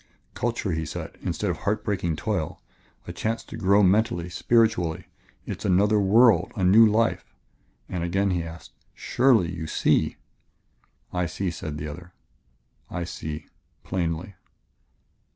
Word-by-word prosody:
"Culture," 120 -4 -2
he 80 -1 -1
said, 75 - -6
"instead - - -1
of - - -4
heart 105 +2 -1
breaking 90 -5 -1
toil, 90 -2 -3 0.5
a - - -7
chance 115 +1 -2
to - - -10
grow 100 -1 +3
mentally, 95 -2 +2
spiritually; 90 -4 +1 0.4
it - - -5
is - - -9
another 105 +3 +3
world, 110 +4 +4
a 100 - -2
new 110 +5 +7
life 110 +2 0 0.3
" - - -41
And 90 -2 -3
again 95 +3 +1
he 90 -1 0
asked: 80 +1 -9 0.2
"Surely, 120 -10 +2
you 80 -2 -5
see?" - - +1 1.0
"I 90 -1 0
see," 90 +3 -3
said 80 -3 -6
the 75 +1 -5
other; 85 +4 -9 0.8
"I 90 0 -3
see 80 -2 -6 0.4
plainly." 85 +1 -3
95 Hz, 145 wpm, -25 LUFS, 85-110 Hz, 1.0 s, new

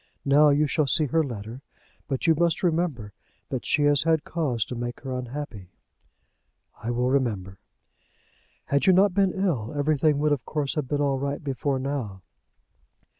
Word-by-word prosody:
Now 145 +2 +5
you 145 +1 +3
shall 150 0 0
see 155 +3 +3
her 160 +4 +1
letter. 115 -1 -7 0.5
But 135 -2 -2
you 165 - +5
must 170 +2 0
remember 160 - -1 0.4
that 130 -3 -4
she 150 - +2
has 145 -1 +4
had 160 -2 +2
cause 140 -10 -1
to 125 - -6
make 120 0 -5
her 135 -1 -5
unhappy." 125 -6 -6 1.1
"I 115 - -4
will 125 +1 0
remember." 105 -9 -1 1.1
"Had 140 +4 +1
you 190 - +7
not 190 +1 +4
been 195 -1 +2
ill, 150 - -2
everything 150 0 +2
would 150 +1 +1
of 140 -5 0
course 145 0 -2
have 150 -4 -2
been 145 +2 -1
all 140 -2 +1
right 140 +2 -3
before 135 0 -1
now." 130 -8 -4
140 Hz, 170 wpm, -25 LUFS, 125-155 Hz, 1.1 s, you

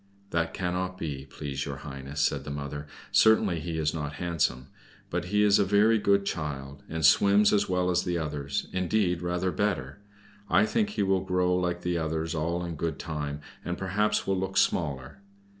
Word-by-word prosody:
"That 85 0 0
cannot 90 0 -2
be, 70 -5 -5
please 70 0 -4
your 70 - -4
Highness," 70 +1 -5
said 70 0 +1
the 75 - -7
mother. 70 +1 -5 0.2
"Certainly 110 -6 +4
he 80 +1 -4
is 75 -1 0
not 75 -3 -4
handsome, 80 -6 -1 0.5
but 85 0 -1
he 105 +3 +2
is 105 -1 +5
a - - +5
very 105 +3 +4
good 100 -1 +3
child, 70 -4 -4
and 80 -1 0
swims 100 +7 +5
as 100 -2 +2
well 90 0 +1
as 90 0 +2
the 90 -1 -1
others, 75 -3 -3
indeed, 90 -1 +1
rather 90 +1 -1
better. 90 -8 -2 0.5
I 105 - +5
think 215 - +1
he 210 - -1
will 95 -1 +2
grow 90 -1 +1
like 90 -1 -1
the 90 -1 0
others 80 0 -2
all 85 +2 -1
in 85 -2 -5
good 80 -1 -2
time, 75 -3 -4 0.2
and 90 0 -3
perhaps 105 +3 0
will 95 -1 0
look 95 +1 -3
smaller. 70 -3 0
85 Hz, 185 wpm, -28 LUFS, 75-95 Hz, 0.5 s, is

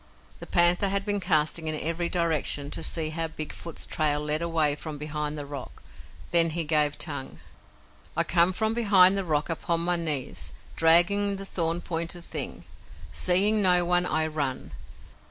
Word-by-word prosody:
The - - -10
panther 175 +3 +4
had 200 0 -1
been 205 -1 +1
casting 160 -2 0
in 155 -1 +1
every 165 +2 -1
direction 160 -4 -1
to - - -3
see 160 -1 -1
how 165 +1 -3
Big 155 -1 -6
Foot's 170 - -7
trail 150 -2 0
led 150 +1 -1
away 165 -3 +1
from 150 +1 -7
behind 150 0 -4
the 145 - -6
rock. 140 -2 -10 0.5
Then 165 -1 +6
he 165 +1 -1
gave 150 -1 +1
tongue: 145 -5 -4 0.8
"I - - +3
come 175 +1 +3
from 220 +4 -1
behind 200 -5 +5
the 195 - -1
rock 150 -4 -1
upon 165 0 -2
my 175 +1 0
knees, 155 -6 -3 0.2
dragging 185 +5 +3
the 195 0 -8
thorn 170 -2 -2
pointed 170 +1 -5
thing. - - -4 0.5
Seeing 200 +4 +4
no 180 -2 +3
one, 180 +1 +2
I 160 - 0
run. 145 -4 -4
165 Hz, 170 wpm, -26 LUFS, 155-180 Hz, 0.8 s, Then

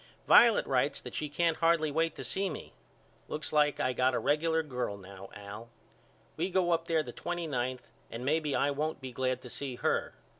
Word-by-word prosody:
Violet 235 -2 +7
writes 135 +2 +1
that - - -9
she 150 - -3
can't 165 +2 +1
hardly 165 -2 +3
wait 165 +2 0
to - - -7
see 195 0 -1
me. 155 - -8 0.5
Looks 155 +1 -4
like 150 -1 +3
I 130 - +1
got 125 +1 +2
a - - +1
regular 160 +2 +1
girl 125 -8 -3
now 95 0 -11
Al. 105 +3 -9 0.7
We 175 +4 0
go 180 -2 +2
up 165 0 +1
there 160 -2 +2
the - - -7
twenty 175 -1 -3
ninth 125 -4 -3 0.2
and 120 +2 -6
maybe 150 0 +1
I 145 - +2
won't 155 +3 -2
be 130 -2 -7
glad 130 +1 -1
to 125 - -9
see 135 -3 -4
her. - - -1
145 Hz, 200 wpm, -31 LUFS, 125-165 Hz, 0.7 s, Violet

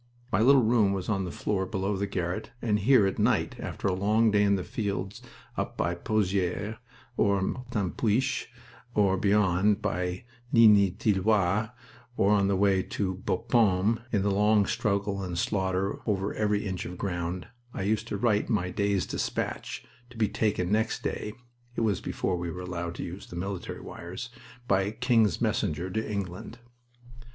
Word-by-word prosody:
My 95 - +2
little 135 +2 +6
room 110 -3 +3
was 95 0 -3
on 95 -3 0
the 90 - -5
floor 95 -2 -1
below 95 0 -1
the 100 +1 -2
garret, 90 +2 -3
and 105 -3 +1
here 120 0 +5
at 95 - -1
night, - - +1
after - - -4
a 95 - +2
long 105 +4 +3
day 105 0 +3
in 100 -1 +4
the 95 - -2
fields 100 -2 -3 0.4
up - - -3
by 85 +2 0
Pozieres 100 +2 -1 0.4
or 100 -1 +3
Martinpuich 115 +3 -1 0.5
or 100 -2 +3
beyond, 100 0 +3
by 90 -3 -2 0.3
Ligny 105 -4 +7
Tilloy, 105 0 +1 0.5
on 100 0 +3
the 100 - +2
way 95 -1 +3
to 95 0 -2
Bapaume, 105 +1 +2
in 100 -3 +1
the 100 - +2
long 105 +1 +4
struggle 100 -2 -1
and 90 -2 -4
slaughter 95 0 0
over 100 -2 0
every 105 -1 0
inch 95 -3 -3
of 90 - -7
ground, 90 -2 -3 0.2
I 95 - -4
used 110 +3 0
to 105 - -3
write 105 0 +1
my 90 -6 0
day's 100 -2 0
despatch, - - -3 0.2
to 120 - -14
be 110 -2 +2
taken 100 -5 0
next 110 +1 0
day 105 - -3 0.4
(it - - -1
was 105 -5 +1
before 90 - -2
we 85 0 -3
were 90 +2 -6
allowed 85 -1 -4
to - - -5
use 90 +4 -7
the - - -10
military 95 +1 -5
wires) 95 +8 -7 0.4
by 95 -1 +2
King's 110 - +2
Messenger 85 +5 -1
to 110 +2 -2
England. 100 +3 -5
100 Hz, 165 wpm, -28 LUFS, 95-105 Hz, 0.5 s, Ligny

